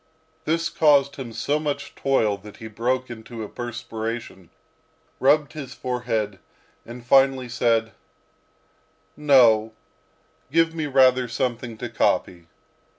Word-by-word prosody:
This 165 Hz, +1 st, 0 dB
caused 140 Hz, -3 st, +3 dB
him 130 Hz, -4 st, -7 dB
so 145 Hz, +6 st, -1 dB
much 145 Hz, -1 st, -4 dB
toil, 115 Hz, -7 st, +1 dB
that 105 Hz, +1 st, -13 dB
he 110 Hz, -, -8 dB
broke 125 Hz, +4 st, -2 dB
into 115 Hz, 0 st, -8 dB
a -, -, -6 dB
perspiration, 115 Hz, -6 st, -6 dB, 0.7 s
rubbed 145 Hz, +2 st, +3 dB
his 145 Hz, -5 st, -8 dB
forehead, 115 Hz, -5 st, -3 dB, 0.5 s
and 120 Hz, +1 st, -10 dB
finally 135 Hz, 0 st, +3 dB
said, 115 Hz, -2 st, +1 dB, 1.2 s
"No, 120 Hz, -7 st, +4 dB, 0.8 s
give 165 Hz, +1 st, +3 dB
me 160 Hz, -2 st, -3 dB
rather 130 Hz, -2 st, +4 dB
something 120 Hz, -1 st, -3 dB
to -, -, -5 dB
copy." 85 Hz, -2 st, -1 dB
125 Hz, 115 wpm, -23 LUFS, 115-140 Hz, 1.2 s, No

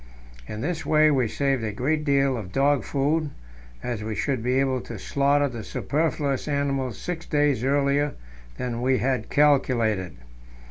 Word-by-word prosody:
In 105 Hz, -, -6 dB
this 165 Hz, +4 st, -2 dB
way 155 Hz, 0 st, +4 dB
we 130 Hz, -5 st, +2 dB
saved 135 Hz, +1 st, 0 dB
a 110 Hz, -, -2 dB
great 150 Hz, +8 st, -1 dB
deal 140 Hz, -2 st, +2 dB
of 105 Hz, -6 st, -6 dB
dog 140 Hz, +1 st, +2 dB
food, 150 Hz, +3 st, 0 dB, 0.5 s
as 120 Hz, -4 st, -3 dB
we 110 Hz, 0 st, -3 dB
should 130 Hz, 0 st, -1 dB
be 125 Hz, +3 st, +1 dB
able 130 Hz, -2 st, +1 dB
to 115 Hz, -, -8 dB
slaughter 140 Hz, +6 st, +2 dB
the 120 Hz, -4 st, -6 dB
superfluous 145 Hz, -3 st, -1 dB
animals 140 Hz, -4 st, -1 dB
six 175 Hz, -2 st, -5 dB
days 145 Hz, -5 st, +1 dB
earlier 140 Hz, +1 st, +1 dB, 0.4 s
than 120 Hz, -1 st, -3 dB
we 130 Hz, +1 st, +2 dB
had 130 Hz, -4 st, -1 dB
calculated. 115 Hz, -, +2 dB
135 Hz, 155 wpm, -25 LUFS, 120-145 Hz, 0.5 s, way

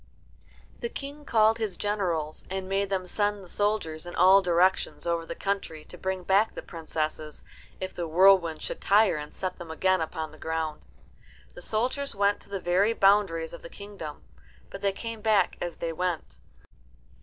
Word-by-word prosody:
The 475 Hz, -, -3 dB
King 290 Hz, -4 st, -7 dB
called 220 Hz, -1 st, +4 dB
his 210 Hz, -5 st, -2 dB
generals, 175 Hz, -7 st, -1 dB
and 190 Hz, 0 st, -3 dB
made 195 Hz, +1 st, 0 dB
them 190 Hz, -2 st, -1 dB
send 205 Hz, +2 st, 0 dB
the -, -, -12 dB
soldiers 175 Hz, -5 st, -1 dB
in 175 Hz, -, -7 dB
all 190 Hz, +2 st, +7 dB
directions 180 Hz, +1 st, +2 dB
over 170 Hz, -1 st, -1 dB
the 170 Hz, -, -5 dB
country 195 Hz, -6 st, -3 dB
to -, -, -12 dB
bring 185 Hz, +1 st, -3 dB
back 200 Hz, +4 st, +3 dB
the -, -, -6 dB
princesses, 155 Hz, -2 st, -4 dB, 0.4 s
if 185 Hz, 0 st, -4 dB
the 170 Hz, -1 st, -3 dB
whirlwind 170 Hz, -2 st, +5 dB
should -, -, -4 dB
tire 205 Hz, -4 st, +4 dB
and 150 Hz, 0 st, -6 dB
set 185 Hz, -1 st, -5 dB
them 170 Hz, -, -8 dB
again 185 Hz, +2 st, +2 dB
upon 160 Hz, -1 st, -4 dB
the -, -, -15 dB
ground. 160 Hz, -1 st, -3 dB, 0.7 s
The -, -, -11 dB
soldiers 250 Hz, +8 st, -1 dB
went 200 Hz, 0 st, +2 dB
to -, -, -15 dB
the 200 Hz, -1 st, -3 dB
very 185 Hz, +5 st, +2 dB
boundaries 195 Hz, -6 st, +3 dB
of 170 Hz, -, -9 dB
the 170 Hz, -, -9 dB
kingdom, 200 Hz, -8 st, -9 dB, 0.5 s
but 195 Hz, -, -8 dB
they 200 Hz, -1 st, +2 dB
came 225 Hz, +2 st, -6 dB
back 210 Hz, -4 st, +3 dB
as 175 Hz, -1 st, -3 dB
they 165 Hz, -1 st, -3 dB
went. 175 Hz, -1 st, -3 dB
185 Hz, 180 wpm, -27 LUFS, 165-205 Hz, 0.7 s, all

